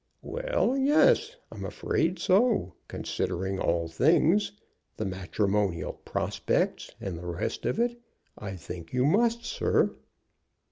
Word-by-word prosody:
"Well, - - 0
yes; 305 - +4 0.2
I'm - - -7
afraid 170 +3 0
so. 205 - +2
Considering 95 +2 -2
all 85 -1 +1
things, 160 - +3 0.5
the 110 - -2
matrimonial 95 -2 -1
prospects - - -1
and 90 -4 -5
the 90 - -7
rest 85 0 -3
of - - -1
it, 240 0 0 0.3
I 100 -2 -6
think 85 -1 -9
you 125 +1 +2
must, 230 +8 +2
sir." - - +1
125 Hz, 120 wpm, -28 LUFS, -, 0.5 s, yes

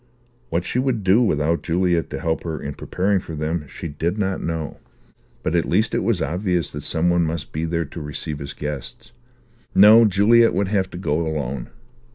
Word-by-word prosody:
What 85 +2 -1
she 120 - -1
would 125 -5 0
do 95 +5 +4
without 80 -6 +1
Juliet 85 -1 0
to 65 - -5
help 80 +2 -1
her 80 -2 -4
in 70 - -5
preparing 95 +6 0
for 80 -3 -8
them, 75 0 -2
she 85 - -7
did 80 +5 -2
not 95 -2 -1
know, 80 -2 -4 0.6
but 80 - -1
at 85 -1 +1
least 110 +6 +2
it - - +2
was 110 -7 +1
obvious 90 +2 -1
that 75 - -6
some 85 +4 +1
one 85 0 +3
must 80 -1 -3
be 80 +2 -2
there 85 0 -1
to 80 +3 -8
receive 75 0 -5
his 70 -1 -6
guests. 95 - -6 0.6
No, 110 +4 +8
Juliet 110 +4 +4
would 100 0 0
have 95 -3 0
to - - -8
go 80 -4 0
alone. 70 -5 -3
85 Hz, 200 wpm, -22 LUFS, 75-100 Hz, 0.6 s, No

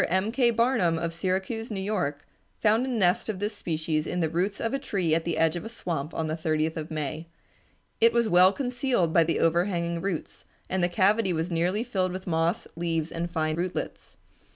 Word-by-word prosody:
M. 190 +5 +1
K. 245 0 +3
Barnum 230 -8 +2
of 165 0 -2
Syracuse, 190 +6 -2
New 205 -3 -3
York, 180 -8 -2 0.3
found 220 +4 +3
a - - -2
nest 220 -3 +1
of 210 - -2
this 205 +2 -3
species 155 -3 -2
in 180 - -2
the 160 -2 0
roots 185 +4 -1
of 230 - -1
a 275 - 0
tree 190 - -1
at 165 0 +1
the 170 - -1
edge 165 0 +3
of 175 - -4
a 225 - -6
swamp 165 -9 -4
on 160 - -1
the 155 0 -2
30th 160 0 0
of 155 -1 -5
May. 155 +1 -4 0.7
It 230 +1 +6
was 235 -1 +2
well 185 -1 +6
concealed 245 - 0
by 170 - +6
the 165 +1 0
overhanging 170 0 +1
roots, 185 -4 -4 0.2
and 190 -1 0
the 175 - +3
cavity 195 +2 +2
was 165 +2 -2
nearly 180 +6 +1
filled 190 -7 -1
with 185 0 -6
moss, 165 0 0
leaves, 165 -1 -1
and 170 +1 -3
fine 155 -2 -1
rootlets. 180 +1 -4
180 Hz, 205 wpm, -27 LUFS, 165-210 Hz, 0.7 s, It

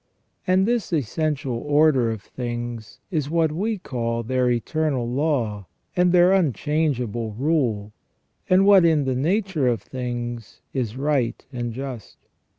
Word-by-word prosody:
And 185 +2 +3
this 235 -4 0
essential 145 -2 -1
order 145 -4 +3
of 110 -3 -4
things 120 -2 -6
is 150 -5 -1
what 165 -1 +2
we 210 +7 -1
call 115 -8 -3
their 125 +1 +1
eternal 130 +1 0
law, 120 - -1 0.3
and 180 0 +3
their 180 +1 +5
unchangeable 135 - 0
rule, 120 -6 0 0.6
and 185 +1 +5
what, 200 -3 +7
in 160 -4 +3
the 130 - 0
nature 170 - 0
of 120 -3 0
things, 120 -3 -5
is 125 -3 -2
right 135 -4 0
and 120 -1 -3
just. 130 -2 -7
135 Hz, 135 wpm, -23 LUFS, 120-160 Hz, 0.6 s, what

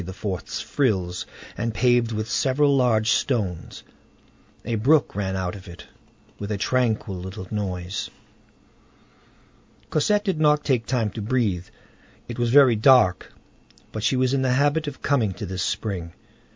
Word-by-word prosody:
's - - -4
frills, 95 -10 -1 0.3
and 115 0 -3
paved 120 0 +2
with 110 0 -3
several 140 +5 +2
large 115 -4 +2
stones. 100 -10 -1 0.8
A 115 - -2
brook 125 +1 +2
ran 95 -2 -2
out 95 -1 -2
of 100 0 -12
it, 85 -1 -11 0.5
with 100 +1 -5
a 105 - -1
tranquil 115 -2 0
little 95 +1 -7
noise. 100 -1 -3 1.8
Cosette 205 +7 +2
did 190 -6 -1
not 150 -1 +3
take 125 -5 0
time 115 -5 0
to 110 - -6
breathe. 105 -6 -1 0.6
It 120 0 -7
was 120 -1 +1
very 130 -2 +6
dark, 110 -5 +4 0.6
but 110 - -5
she 115 +5 +1
was 130 0 +1
in 135 - +1
the 130 -1 +1
habit 145 +3 +1
of 145 - -7
coming 120 -9 +1
to 95 - -6
this 95 0 -4
spring. 90 -5 -3
115 Hz, 150 wpm, -24 LUFS, 100-130 Hz, 1.8 s, very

